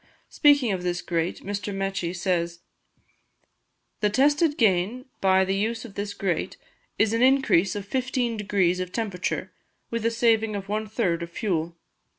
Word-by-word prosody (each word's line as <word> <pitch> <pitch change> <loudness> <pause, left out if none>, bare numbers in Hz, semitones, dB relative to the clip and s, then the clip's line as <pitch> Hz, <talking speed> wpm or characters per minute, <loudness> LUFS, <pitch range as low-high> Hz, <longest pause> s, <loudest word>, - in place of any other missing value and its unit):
Speaking 285 -6 +4
of 185 -2 -2
this 180 0 -1
grate, 170 -1 -2
Mr. 205 0 -3
Mechi 195 -3 -2
says: 170 -2 -1 1.4
"The 210 - +2
tested 290 +7 +3
gain 215 +4 +2 0.2
by 190 0 +4
the 190 - 0
use 225 +4 -1
of 220 - -11
this 205 0 -4
grate 190 -4 -2 0.4
is 220 0 +2
an 230 - +1
increase 255 -9 +4
of 205 -2 -4
15 250 +1 -1
degrees 195 -4 +1
of 185 -1 -4
temperature, 200 -6 -3 0.4
with 230 -1 -2
a 230 - +3
saving 225 -2 +2
of 195 -1 -5
one 215 +1 -2
third 190 -6 0
in 170 - -4
fuel. 170 -2 -2
205 Hz, 160 wpm, -25 LUFS, 180-230 Hz, 1.4 s, Speaking